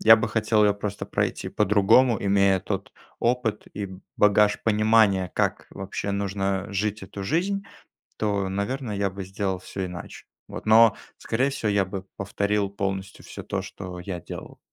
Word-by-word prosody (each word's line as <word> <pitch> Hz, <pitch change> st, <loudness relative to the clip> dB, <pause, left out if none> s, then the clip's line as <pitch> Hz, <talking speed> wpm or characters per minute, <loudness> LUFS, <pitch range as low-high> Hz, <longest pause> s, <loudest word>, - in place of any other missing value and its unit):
я 110 Hz, -, +9 dB
бы 115 Hz, 0 st, 0 dB
хотел 110 Hz, -1 st, +2 dB
её 105 Hz, -1 st, +4 dB
просто 100 Hz, 0 st, -5 dB
пройти -, -, -1 dB
по-другому, 105 Hz, +3 st, +4 dB
имея 100 Hz, -1 st, +3 dB
тот 95 Hz, 0 st, -4 dB, 0.3 s
опыт 120 Hz, -3 st, 0 dB
и 100 Hz, 0 st, -3 dB
б 95 Hz, -1 st, -11 dB, 0.2 s
багаж 105 Hz, 0 st, +4 dB
понимания, 105 Hz, -4 st, +3 dB
как -, -, 0 dB
вообще 95 Hz, +1 st, -4 dB
нужно 100 Hz, -1 st, -1 dB
жить 105 Hz, +1 st, -1 dB
эту 100 Hz, +1 st, -7 dB
жизнь, 190 Hz, -, 0 dB, 0.5 s
то, 100 Hz, -3 st, 0 dB
наверное, 105 Hz, +4 st, -3 dB
я 100 Hz, 0 st, 0 dB
бы 95 Hz, +1 st, -7 dB
сделал 95 Hz, 0 st, -3 dB
всё 95 Hz, +1 st, -5 dB
иначе, 90 Hz, -1 st, -8 dB, 0.2 s
вот -, -, -8 dB
но 110 Hz, 0 st, +7 dB, 0.2 s
скорее 130 Hz, +5 st, 0 dB
всего 135 Hz, -6 st, -2 dB
я 100 Hz, -1 st, +2 dB
бы 95 Hz, 0 st, -6 dB
повторил 100 Hz, 0 st, 0 dB
полностью 100 Hz, -1 st, -4 dB
всё -, -, -9 dB
то, -, -, -3 dB
что 90 Hz, -2 st, -8 dB
я 90 Hz, 0 st, -5 dB
делал. -, -, -9 dB
100 Hz, 165 wpm, -25 LUFS, 95-110 Hz, 0.5 s, я